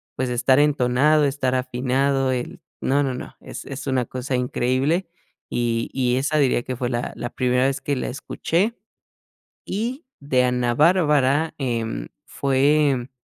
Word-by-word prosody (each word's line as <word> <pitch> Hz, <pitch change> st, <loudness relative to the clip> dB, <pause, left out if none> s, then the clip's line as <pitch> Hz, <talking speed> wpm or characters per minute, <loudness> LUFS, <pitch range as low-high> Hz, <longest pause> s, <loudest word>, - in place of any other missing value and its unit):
pues, 130 Hz, 0 st, -1 dB
estar 125 Hz, +2 st, +3 dB
entonado, 145 Hz, +1 st, +3 dB
estar 135 Hz, -2 st, 0 dB
afinado, 130 Hz, +1 st, 0 dB
el 125 Hz, -1 st, -4 dB, 0.2 s
No, 145 Hz, +2 st, +2 dB
no, 130 Hz, -2 st, -1 dB
no, 125 Hz, -, -8 dB
es -, -, -9 dB
es 135 Hz, +1 st, -7 dB
una 130 Hz, -2 st, +1 dB
cosa 130 Hz, +1 st, -3 dB
increíble. 130 Hz, +8 st, 0 dB, 0.4 s
Y 115 Hz, -1 st, -1 dB
y 125 Hz, -2 st, +1 dB
esa 150 Hz, +3 st, 0 dB
diría 125 Hz, -3 st, +2 dB
que 130 Hz, -, -4 dB
fue 125 Hz, 0 st, -2 dB
la 120 Hz, -1 st, -3 dB
la 120 Hz, +1 st, -4 dB
primera 125 Hz, 0 st, +1 dB
vez 135 Hz, 0 st, -2 dB
que 140 Hz, 0 st, -1 dB
la -, -, -3 dB
escuché. 175 Hz, -, -1 dB, 0.9 s
Y 245 Hz, -, -3 dB
de 130 Hz, -3 st, +1 dB
Ana 125 Hz, -1 st, +1 dB
Bárbara, 150 Hz, -2 st, +3 dB
em, 115 Hz, -, -2 dB, 0.2 s
fue 140 Hz, -1 st, +2 dB
130 Hz, 150 wpm, -23 LUFS, 125-145 Hz, 0.9 s, estar